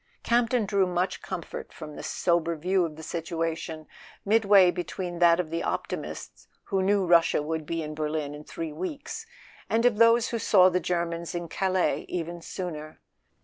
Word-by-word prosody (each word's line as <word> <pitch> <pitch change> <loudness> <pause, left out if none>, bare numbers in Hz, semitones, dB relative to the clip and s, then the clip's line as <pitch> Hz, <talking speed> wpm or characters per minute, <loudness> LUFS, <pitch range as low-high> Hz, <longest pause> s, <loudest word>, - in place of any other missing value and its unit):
Campton 235 -1 +2
drew 195 -1 +2
much 180 +1 -1
comfort 180 -3 -6
from 155 -2 -9
this - - -6
sober 170 -1 +1
view 180 +3 +1
of 155 -2 -6
the 160 - -10
situation, 165 -1 -3 0.4
midway 200 -3 +6
between 175 0 -5
that 170 -1 +5
of 165 -3 -2
the 165 - -1
optimists - - -5 0.2
who 195 -3 -1
knew 195 0 +2
Russia 170 -2 +4
would 160 0 -3
be 165 -1 -2
in 155 0 -5
Berlin 150 -1 -2
in 150 0 -9
three 160 0 -6
weeks, 280 - -6 0.4
and 230 +2 +2
of 230 -3 +3
those 230 0 +5
who 230 - -2
saw 185 -3 +6
the 180 0 0
Ger¬ 170 -1 0
mans 170 +1 -5
in 175 -1 -3
Calais 185 +1 0
even 170 -1 -4
sooner. 155 -4 -6
175 Hz, 175 wpm, -27 LUFS, 165-195 Hz, 0.4 s, midway